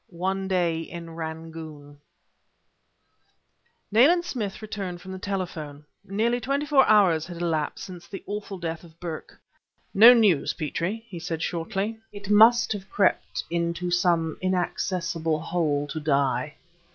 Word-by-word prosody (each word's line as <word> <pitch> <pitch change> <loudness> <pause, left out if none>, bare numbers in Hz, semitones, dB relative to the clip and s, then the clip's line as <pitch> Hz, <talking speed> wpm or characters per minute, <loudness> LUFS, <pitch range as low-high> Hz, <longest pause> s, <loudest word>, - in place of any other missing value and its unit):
ONE 190 +2 -2
DAY 175 -3 +1
IN 170 0 -8
RANGOON 160 -3 -8 1.9
Nayland 315 - +5
Smith 215 - -4
returned 195 -5 -5
from 190 - -10
the 190 - -6
telephone. 165 -7 -5 0.2
Nearly 225 +5 0
twenty 280 +5 -1
four 285 -3 +5
hours 185 -7 +4
had 175 -1 -8
elapsed 165 -3 -2
since 175 -2 -10
the 195 - -8
awful 205 -1 -5
death 165 -1 -5
of 165 -1 -17
Burke. 165 -3 -7 0.5
"No 225 +5 +10
news, 205 -10 +3
Petrie," 175 +9 -3
he 185 -6 -8
said, 165 -1 -4
shortly. 195 +6 -2
"It 205 0 -6
must 225 +3 +6
have 195 -1 -8
crept 200 -2 +1
into 170 +1 -1
some 170 -3 +1
inaccessible 175 -3 -1
hole 155 -3 0
to 155 - -4
die." 140 -1 0
175 Hz, 135 wpm, -25 LUFS, 160-205 Hz, 1.9 s, No